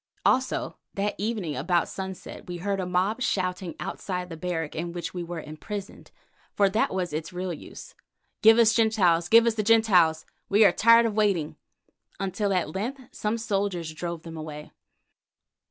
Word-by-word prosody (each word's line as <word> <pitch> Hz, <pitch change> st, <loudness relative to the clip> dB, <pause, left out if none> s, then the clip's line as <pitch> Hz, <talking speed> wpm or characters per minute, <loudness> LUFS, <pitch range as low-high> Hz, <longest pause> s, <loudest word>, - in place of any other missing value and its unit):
Also 260 Hz, +1 st, +1 dB, 0.2 s
that 200 Hz, +1 st, -1 dB
evening, 205 Hz, -8 st, -2 dB
about 175 Hz, -2 st, +1 dB
sunset, 190 Hz, -2 st, -7 dB
we 175 Hz, -1 st, -5 dB
heard 195 Hz, +2 st, -2 dB
a 185 Hz, -, -2 dB
mob 185 Hz, +7 st, 0 dB
shouting 185 Hz, -5 st, -1 dB
outside 180 Hz, -2 st, -4 dB
the 165 Hz, -, -6 dB
barrack 165 Hz, -2 st, -3 dB
in 170 Hz, +2 st, -3 dB
which 175 Hz, -1 st, -5 dB
we 180 Hz, -, -4 dB
were 170 Hz, 0 st, -5 dB
imprisoned, 190 Hz, +7 st, -8 dB, 0.5 s
for 200 Hz, -, +4 dB
that 215 Hz, +3 st, +1 dB
was 180 Hz, -4 st, -2 dB
its 155 Hz, 0 st, -4 dB
real 180 Hz, 0 st, -3 dB
use, 155 Hz, -, -11 dB, 0.5 s
"Give 225 Hz, 0 st, +7 dB
us 230 Hz, -2 st, +6 dB
the -, -, 0 dB
Gentiles! 180 Hz, -7 st, +3 dB
Give 230 Hz, +1 st, +7 dB
us 235 Hz, -, +3 dB
the 220 Hz, -, -1 dB
Gentiles! 195 Hz, -8 st, +4 dB, 0.2 s
We 210 Hz, +2 st, +5 dB
are 195 Hz, -, +7 dB
tired 230 Hz, +5 st, +6 dB
of 225 Hz, -, 0 dB
waiting," 200 Hz, -8 st, +1 dB, 0.6 s
until 195 Hz, +1 st, -1 dB
at 180 Hz, -5 st, 0 dB
length 240 Hz, +8 st, -3 dB
some 215 Hz, +2 st, -2 dB
soldiers 195 Hz, -7 st, -2 dB
drove 170 Hz, 0 st, -5 dB
them 165 Hz, -1 st, -8 dB
away. 150 Hz, -1 st, -8 dB
185 Hz, 170 wpm, -26 LUFS, 170-215 Hz, 0.6 s, Give